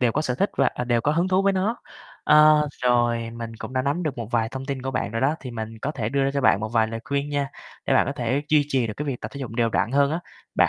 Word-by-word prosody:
đều 120 -3 +2
có 155 - 0
sở 125 - -1
thích 195 +11 0
và, - - +4
à, 125 - -5
đều 120 -1 +1
có 145 +6 +1
hứng 170 +3 +1
thú 185 +1 +3
với 195 0 +3
nó. 195 +5 0 0.5
Ơ, 150 0 +6
rồi 120 -2 +2
mình 115 -1 -7
cũng 130 - -8
đã 130 - 0
nắm 140 +6 -1
được 150 -7 -3
một 115 -3 -5
vài 115 -2 +1
thông 135 +2 -7
tin 135 -2 -4
của 135 - -2
bạn 130 -6 -2
rồi 115 - -1
đó, 145 +4 +2
thì 130 - -7
mình 110 -1 -6
có 150 - -1
thể 115 -8 -2
đưa 140 +3 +1
ra 135 - +1
cho 140 - +1
bạn 110 -6 +4
một 110 - -3
vài 110 0 +2
lời 115 0 -5
khuyên 140 +1 -2
nha, 140 -1 -1 0.4
để - - +3
bạn - - +4
có 140 - -1
thể 130 +1 -1
duy 150 -1 +4
trì 130 -4 +1
được 105 - -5
cái 150 - -4
việc 135 -4 -3
tập - - -6
thể 140 - -6
dục 130 -5 -5
đều 115 0 0
đặn 115 - 0
hơn 140 0 +3
á. 165 - -1 0.3
Bạn, - - +4
130 Hz, 320 wpm, -24 LUFS, 115-145 Hz, 0.5 s, Ơ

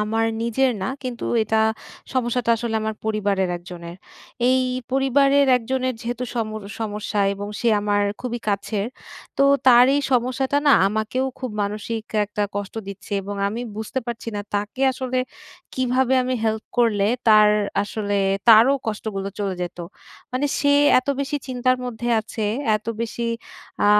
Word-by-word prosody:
আমার 225 +2 0 0.2
নিজের 250 +3 +2
না 195 - -1
কিন্তু 250 -2 -4 0.2
এটা 220 +1 +1 0.5
সমস্যাটা 240 -1 0
আসলে 230 0 -3
আমার 220 0 -2
পরিবারের 200 -3 0
একজনের। 175 0 -9 0.5
এই 260 0 +4 0.3
পরিবারের 275 +1 +4
একজনের 255 +1 -1
যেহেতু 245 +1 -3
সম 230 -2 0 0.3
সমস্যা 210 -1 -2
এবং 205 +1 -6
সে 240 - +2
আমার 205 0 +1 0.2
খুবই 240 -1 -3
কাছের 200 0 -1 0.5
তো 275 - +5 0.2
তার 245 -1 +8
এই 285 - +2
সমস্যাটা 255 +3 +1
না 285 - +7 0.2
আমাকেও 220 +5 -1
খুব 255 -2 -4
মানসিক 215 +2 -3 0.2
একটা 210 0 -3
কষ্ট 205 0 -4
দিচ্ছে 200 +1 -9
এবং 205 +1 -5
আমি 225 +4 -4 0.2
বুঝতে 220 +4 -3
পারছি 235 -1 -5
না 205 - -2
তাকে 205 +5 -2
আসলে 255 0 -2 0.6
কীভাবে 260 0 +1
আমি 255 +1 -1
হেল্প 220 0 -1
করলে 210 -4 +3 0.2
তার 215 -1 +7 0.3
আসলে 205 0 -2 0.3
তারও 230 +5 +8
কষ্টগুলো 210 -2 -3
চলে 200 -2 -1
যেতো। 175 0 -5 0.5
মানে 260 +3 0
সে 285 0 +3 0.3
এত 255 - -5
বেশি 280 +1 -1
চিন্তার 255 0 +1
মধ্যে 240 -1 -4
আছে, 220 0 -5 0.3
এতো 215 +2 -5
বেশি 235 +1 -3 0.6
আ - - +5
225 Hz, 150 wpm, -22 LUFS, 210-255 Hz, 0.6 s, তার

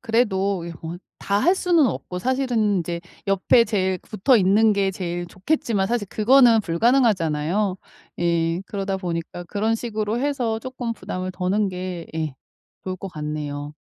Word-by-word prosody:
그래도 200 -6 +1
이 170 - -6
요 165 +1 -7 0.2
다 200 0 +1
할 360 +3 +5
수는 340 -5 +3
없고 180 -5 -4
사실은 240 -5 +1
이제 170 0 -3 0.3
옆에 195 +4 +4
제일 190 -4 0
붙어 215 +8 +2
있는 210 +2 +4
게 200 -1 +1
제일 175 -1 -4
좋겠지만 195 - -1
사실 230 -3 -1
그거는 235 +1 +5
불가능하잖아요. 190 - +1 0.4
예. 170 0 +1
그러다 195 -1 -2
보니까 175 -1 -4
그런 215 +5 0
식으로 220 -1 -2
해서 255 -6 0
쪼끔 255 -2 -4
부담을 185 -4 -5
더는 195 +3 0
게 180 -2 -5
예 155 -4 -2 0.5
좋을 185 - -3
것 195 - -7
같네요. 150 -2 -5
195 Hz, 310 characters per minute, -23 LUFS, 175-225 Hz, 0.5 s, 할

